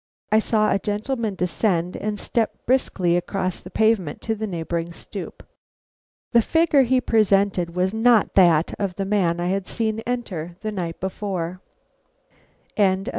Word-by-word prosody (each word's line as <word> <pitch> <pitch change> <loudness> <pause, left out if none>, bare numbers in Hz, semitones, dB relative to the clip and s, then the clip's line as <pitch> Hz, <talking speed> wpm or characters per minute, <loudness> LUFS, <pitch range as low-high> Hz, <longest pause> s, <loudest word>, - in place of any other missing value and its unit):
I 215 - +5
saw 215 -1 +2
a 195 - +1
gentleman 215 +1 -2
descend 180 0 0
and 210 -1 -3
step 230 -2 -2
briskly 190 -9 +1
across 185 +1 -2
the 185 - -11
pavement 215 -8 +1
to 225 - -1
the 220 0 -4
neighboring 170 -2 -3
stoop. - - -8 0.9
The 235 - +5
figure 320 +2 +3
he 260 0 +3
presented 200 -7 +2
was 185 +2 +1
not 225 -1 +3
that 170 -4 +4
of 195 -3 -2
the 195 - -2
man 185 -4 +1
I 175 +1 -1
had 195 0 -1
seen 220 -1 -2
enter 180 -9 -4
the 215 0 -3
night 175 -5 -4
before. 185 -2 -4
195 Hz, 145 wpm, -23 LUFS, 175-220 Hz, 0.9 s, I